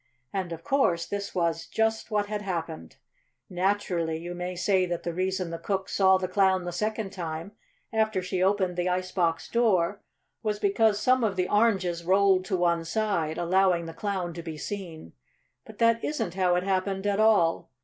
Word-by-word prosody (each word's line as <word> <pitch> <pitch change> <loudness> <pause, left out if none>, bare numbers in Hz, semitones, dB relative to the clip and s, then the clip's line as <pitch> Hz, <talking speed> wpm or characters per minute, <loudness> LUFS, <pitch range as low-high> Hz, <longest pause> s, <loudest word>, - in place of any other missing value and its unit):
And, 190 -3 -2
of 165 0 -7
course, 175 -12 +1
this 200 -1 -5
was 165 -2 0
just 220 0 0
what 210 -2 +1
had 210 0 -4
happened. 165 - -5 0.6
Naturally 180 -3 0
you 175 +2 -6
may 180 +1 -4
say 185 +1 +2
that 175 -1 -3
the 170 - -3
reason 185 0 -2
the 165 - -5
cook 190 -1 -2
saw 190 -1 +4
the 185 0 -2
Clown 190 -1 +2
the 175 - -3
second 215 +2 -2
time, 165 0 -5 0.4
after 220 -3 +1
she 185 0 -2
opened 190 -2 +1
the 180 +1 0
ice 185 0 -2
box 165 -3 0
door, 205 -5 +1 0.4
was 210 -1 -1
because 205 +1 +2
some 255 +2 +3
of 205 -3 +1
the 180 -1 0
oranges 190 -6 +1
rolled 190 +1 +3
to 190 -1 -1
one 170 -1 +1
side, 165 -4 -1
allowing 180 0 +2
the 165 - -7
Clown 185 -3 -3
to 170 - -6
be 160 -2 -7
seen. 170 - -7 0.5
But 215 - -12
that 230 0 +3
isn't 295 - -2
how 180 -1 +2
it 180 - 0
happened 195 0 -1
at 205 0 +1
all. 210 -7 +3
185 Hz, 185 wpm, -27 LUFS, 175-205 Hz, 0.6 s, saw